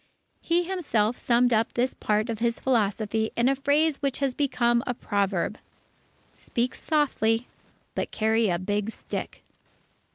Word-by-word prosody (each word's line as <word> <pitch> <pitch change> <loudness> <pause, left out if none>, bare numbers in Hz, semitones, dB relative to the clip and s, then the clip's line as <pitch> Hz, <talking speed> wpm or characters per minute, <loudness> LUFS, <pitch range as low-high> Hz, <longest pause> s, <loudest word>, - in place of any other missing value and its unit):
_" - - -38 0.4
He 345 +1 +2
himself 285 - 0
summed 245 0 +3
up 220 0 +1
this 250 +2 +1
part 215 +2 0
of 220 - -5
his 235 0 0
philosophy 220 -2 0
in 235 +1 +2
a 275 - +3
phrase 285 +2 +2
which 275 -2 -1
has 275 -2 0
become 240 -4 +1
a 245 - -1
proverb: 200 -2 -1 0.8
"_Speak 245 +1 -2
softly; 245 -7 +1 0.5
but - - -2
carry 220 0 +1
a 175 - +1
big 205 +3 -2
stick. - - -6
235 Hz, 150 wpm, -26 LUFS, 220-270 Hz, 0.8 s, summed